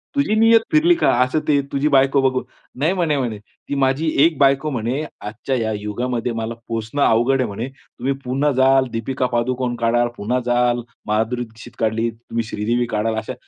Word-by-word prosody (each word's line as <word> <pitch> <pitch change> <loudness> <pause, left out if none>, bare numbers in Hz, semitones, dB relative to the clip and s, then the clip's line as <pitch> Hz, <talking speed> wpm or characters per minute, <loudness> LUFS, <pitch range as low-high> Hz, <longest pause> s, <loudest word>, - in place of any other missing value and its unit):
तुझी 280 -7 +1
नियत 225 0 +6
फिरली 330 +3 +5
का?" - - +2
असं 130 +5 0
ते, 145 -2 +3
"तुझी 140 +2 +1
बायको 135 0 +4
बघून". 130 -1 +1 0.4
नाही 160 +6 +2
म्हणे, 165 -6 0
म्हणे. 115 -6 -2
"ती 125 +6 -9
माझी 135 +5 +1 0.2
एक 165 -4 +1
बायको 140 +2 +3
म्हणे 125 +5 -2 0.2
आजच्या 110 +5 -4
या 110 -1 -1
युगामध्ये 120 +3 -2
मला 115 0 -3
पोसणं 115 +5 -3
अवघड 120 +4 +3
आहे - - 0
म्हणे. 110 +5 -4
तुम्ही 135 0 -5
पुन्हा 135 +4 +1
जाल, 135 0 +5
दीपिका 125 +3 -2
पादुकोण 125 +1 -1
काढाल. 120 +1 +2
पुन्हा 120 +5 -1
जाल, 120 0 +2 0.3
माधुरी 110 +3 0
दीक्षित 115 +1 -13
काढली. 115 +1 0
तुम्ही 115 0 -5
श्रीदेवी 120 +4 0
काढाल 110 +1 0
अशा 110 +4 -4
125 Hz, 180 wpm, -20 LUFS, 115-140 Hz, 0.4 s, नियत